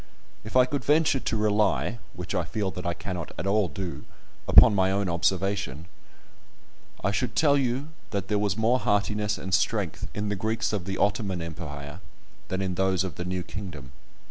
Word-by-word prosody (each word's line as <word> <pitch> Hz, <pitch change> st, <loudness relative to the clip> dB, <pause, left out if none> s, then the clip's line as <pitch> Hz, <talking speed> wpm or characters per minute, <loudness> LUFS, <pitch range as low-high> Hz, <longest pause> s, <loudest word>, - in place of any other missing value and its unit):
If 110 Hz, -, -9 dB
I 125 Hz, -, +7 dB
could 135 Hz, 0 st, -3 dB
venture 150 Hz, -2 st, +3 dB
to 115 Hz, -, -1 dB
rely 105 Hz, +2 st, +1 dB, 0.2 s
(which 90 Hz, 0 st, -5 dB
I -, -, +1 dB
feel 105 Hz, -4 st, -2 dB
that 90 Hz, 0 st, -5 dB
I 85 Hz, -, -1 dB
cannot 90 Hz, -4 st, -5 dB
at 85 Hz, -, -3 dB
all 100 Hz, 0 st, +3 dB
do) 95 Hz, -1 st, -6 dB, 0.4 s
upon 110 Hz, -, +8 dB
my 95 Hz, -2 st, +3 dB
own 100 Hz, 0 st, 0 dB
observation, 90 Hz, -3 st, 0 dB, 1.2 s
I 100 Hz, -, +2 dB
should 110 Hz, 0 st, -1 dB
tell 145 Hz, -2 st, +4 dB
you 135 Hz, +2 st, 0 dB, 0.2 s
that 100 Hz, -2 st, -3 dB
there 105 Hz, 0 st, +1 dB
was 105 Hz, 0 st, 0 dB
more 115 Hz, +3 st, +3 dB
heartiness 105 Hz, 0 st, +1 dB
and 95 Hz, 0 st, -5 dB
strength 95 Hz, -, 0 dB
in 105 Hz, 0 st, -2 dB
the 105 Hz, -, 0 dB
Greeks 110 Hz, +3 st, -1 dB
of 100 Hz, -4 st, -2 dB
the 95 Hz, 0 st, -3 dB
Ottoman 100 Hz, -3 st, 0 dB
Empire 75 Hz, -2 st, -7 dB, 0.5 s
than 95 Hz, +1 st, -2 dB
in 95 Hz, -1 st, -1 dB
those 95 Hz, 0 st, +1 dB
of 95 Hz, -, -4 dB
the 90 Hz, -, -5 dB
new 90 Hz, 0 st, -2 dB
kingdom. 85 Hz, -11 st, -8 dB
100 Hz, 185 wpm, -27 LUFS, 90-110 Hz, 1.2 s, upon